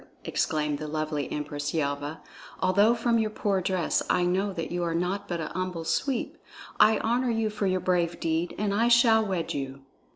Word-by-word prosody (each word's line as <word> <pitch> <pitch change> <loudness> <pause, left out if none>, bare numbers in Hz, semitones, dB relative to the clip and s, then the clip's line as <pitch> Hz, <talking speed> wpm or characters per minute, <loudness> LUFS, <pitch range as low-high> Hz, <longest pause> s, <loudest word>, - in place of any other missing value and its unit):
exclaimed 150 -2 -1
the 155 - -5
lovely 155 -1 -3
Empress 145 +1 -3
Yelva. 145 0 -2 0.4
"Although 200 +5 +4
from 235 0 +1
your 220 -1 +1
poor 200 -2 0
dress 185 -2 0
I 180 - +3
know 190 +3 +1
that 165 -3 -5
you 175 0 -1
are 165 -1 -1
naught 180 +4 -1
but 175 -2 -3
a 160 - -3
humble 185 -3 -3
Sweep, 265 - -1 0.4
I 215 0 +6
honor 245 +2 0
you 225 -2 0
for 205 -1 -1
your 185 -1 0
brave 175 -2 0
deed, 165 +1 -1
and 205 -1 0
I 230 +3 +2
shall 235 -2 +5
wed 185 -5 -2
you." 135 -1 -5
180 Hz, 190 wpm, -27 LUFS, 160-210 Hz, 0.4 s, I